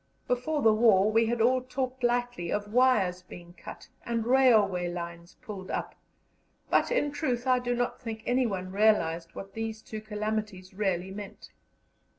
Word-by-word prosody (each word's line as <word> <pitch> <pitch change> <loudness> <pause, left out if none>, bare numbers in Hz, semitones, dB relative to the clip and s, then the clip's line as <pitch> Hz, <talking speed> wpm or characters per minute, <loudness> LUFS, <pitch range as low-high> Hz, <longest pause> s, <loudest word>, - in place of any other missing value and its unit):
Before 280 +5 -1
the 220 -1 +6
war 215 -2 +4
we 225 +1 +3
had 235 0 0
all 255 +3 +3
talked 255 0 -4
lightly 245 -7 0
of 205 0 -3
wires 215 -8 +3
being 175 -1 -12
cut - - -11 0.2
and 230 -1 -2
railway 215 -9 +4
lines 170 0 -7
pulled 195 -3 -8
up, - - -3 0.8
but, - - +3
in 290 -13 +1
truth, 255 -4 -2
I 255 -1 +3
do 245 0 -1
not 245 +1 -2
think 220 -3 -6
anyone 215 -8 0
realized 175 -5 +1
what 195 0 -8
these 225 -1 -5
two 215 -1 -7
calamities 215 -3 -4
really 190 -2 -1
meant. 200 0 -9
220 Hz, 160 wpm, -28 LUFS, 190-245 Hz, 0.8 s, the